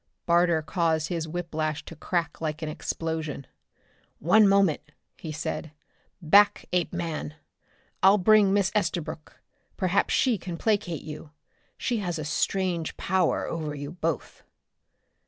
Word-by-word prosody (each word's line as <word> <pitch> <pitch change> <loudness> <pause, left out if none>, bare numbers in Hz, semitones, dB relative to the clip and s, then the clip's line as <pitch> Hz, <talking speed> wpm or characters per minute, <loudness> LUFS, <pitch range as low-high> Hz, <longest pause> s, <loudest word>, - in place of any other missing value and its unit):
Barter 170 -2 +3
caused 160 -2 0
his 165 -3 -2
whiplash 155 -2 -3
to 165 - -9
crack 165 -1 -2
like 155 0 -3
an 155 - -2
explosion. 155 -2 -4 0.7
"One 205 +7 +5
moment," 195 -5 +3 0.3
he 160 - -7
said. 155 0 -4 0.5
"Back, 200 +6 +5
Apeman! 170 -4 -2 0.7
I'll 195 +2 +6
bring 210 0 +5
Miss 200 -1 +2
Estabrook. 175 -6 -3 0.4
Perhaps 185 0 +1
she 245 -6 +2
can 175 -1 -6
placate 200 -6 0
you. 150 0 -8 0.5
She 245 - -1
has 175 -5 -2
a 155 - -4
strange 175 +1 -1
power 185 -2 +1
over 155 -3 -4
you 145 +1 -6
both!" 165 -4 -3
170 Hz, 125 wpm, -26 LUFS, 155-190 Hz, 0.7 s, I'll